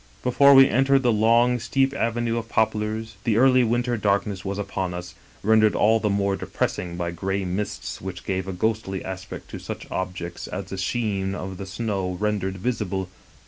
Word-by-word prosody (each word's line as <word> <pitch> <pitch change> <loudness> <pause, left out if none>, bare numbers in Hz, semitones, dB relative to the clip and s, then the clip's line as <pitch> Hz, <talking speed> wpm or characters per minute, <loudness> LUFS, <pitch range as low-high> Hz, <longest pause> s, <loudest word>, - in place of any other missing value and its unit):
" - - -29
Before 140 +3 +6
we 135 0 +9
entered 135 +3 +3
the 120 -2 +3
long, 115 +3 +4
steep 135 +3 +1
avenue 115 -2 0
of 115 0 -9
poplars, 110 0 -1
the 110 -2 +1
early 130 0 +5
winter 120 +1 0
darkness 100 -1 0
was 100 0 -3
upon 95 -3 -3
us, 90 0 -7 0.3
rendered 110 0 +4
all 110 +2 +4
the 105 - 0
more 100 0 +1
depressing 85 -2 -3
by 85 -1 -2
gray 95 +3 -2
mists 95 +3 -4
which 90 -1 -7
gave 95 -1 -2
a - - -2
ghostly 95 0 -2
aspect 95 0 -7
to - - -6
such - - -7
objects 90 -2 -4
as - - -5
the 95 - -4
sheen 100 -2 -1
of 95 -1 -6
the 95 - -7
snow 95 -3 -2
rendered 100 -3 -1
visible. 95 -4 -2
105 Hz, 185 wpm, -24 LUFS, 95-115 Hz, 0.3 s, we